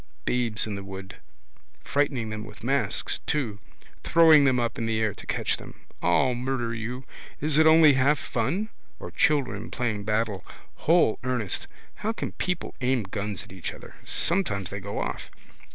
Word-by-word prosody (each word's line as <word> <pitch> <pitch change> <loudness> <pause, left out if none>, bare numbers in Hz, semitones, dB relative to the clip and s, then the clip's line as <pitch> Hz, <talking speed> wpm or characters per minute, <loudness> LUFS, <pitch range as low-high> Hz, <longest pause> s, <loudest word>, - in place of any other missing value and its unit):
Babes 120 -4 0
in 110 - -4
the 100 0 -5
wood. 95 0 -8 0.7
Frightening 135 - 0
them 105 0 -4
with 110 - -12
masks 120 -4 0
too. 120 -9 -1 0.4
Throwing 160 -3 +7
them 130 -2 +3
up 120 0 -1
in 115 - -1
the 110 -1 0
air 110 -2 +1
to - - -12
catch - - 0
them. - - -12 0.2
I'll 85 +9 +3
murder 120 -1 -2
you. 120 +3 -5 0.3
Is 150 0 +2
it 160 - +6
only 160 -2 +8
half 135 +3 +3
fun? 145 - -1 0.3
Or - - -7
children 125 -8 +1
playing 110 -5 -2
battle. 105 -3 -1 0.3
Whole 165 -8 +3
earnest. 125 -6 -2 0.3
How 220 +2 -2
can - - -4
people 180 -1 -3
aim 125 -2 +1
guns 100 0 -4
at - - -16
each 95 -3 -6
other. - - -12
Sometimes 100 - +1
they 100 - -4
go 100 +1 -6
off. - - -4
120 Hz, 170 wpm, -26 LUFS, 105-140 Hz, 0.7 s, only